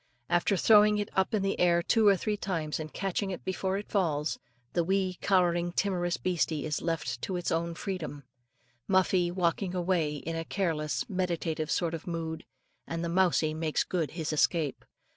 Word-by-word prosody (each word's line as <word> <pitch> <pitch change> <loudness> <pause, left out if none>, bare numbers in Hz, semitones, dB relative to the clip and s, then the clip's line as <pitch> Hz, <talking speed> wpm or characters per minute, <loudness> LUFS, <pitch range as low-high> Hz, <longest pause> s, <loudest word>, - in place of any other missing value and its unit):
After 175 +3 +2
throwing 210 +1 +6
it 205 -1 -2
up 190 +4 +1
in 200 - 0
the 195 - -1
air 170 -1 +4
two 220 +3 +3
or 200 -1 +6
three 210 +3 -1
times, 165 -7 -3
and 155 -1 -6
catching 195 +1 -2
it 185 - -6
before 190 +1 -1
it 205 - -6
falls, 160 -6 0 0.3
the 170 - +2
wee 190 0 0
"cowering 175 -2 +2
timorous 175 -3 0
beastie" 165 -4 -1
is 150 -2 -2
left 150 -8 -2
to 190 - -3
its 175 -1 -2
own 170 +1 -1
freedom, 160 -7 -5 0.6
Muffie 185 -2 +3
walking 180 +1 0
away 175 -4 +1
in 165 +3 -5
a 165 - -2
careless, 165 -3 -1
meditative 170 -5 -2
sort 170 -1 0
of 165 +3 -6
mood, 165 -2 -4 0.4
and 165 +1 -3
the - - -2
mousie 170 -3 +2
makes 155 -1 0
good 170 -5 -1
his 160 -2 -2
escape. 155 -1 +1
175 Hz, 180 wpm, -29 LUFS, 160-190 Hz, 0.6 s, throwing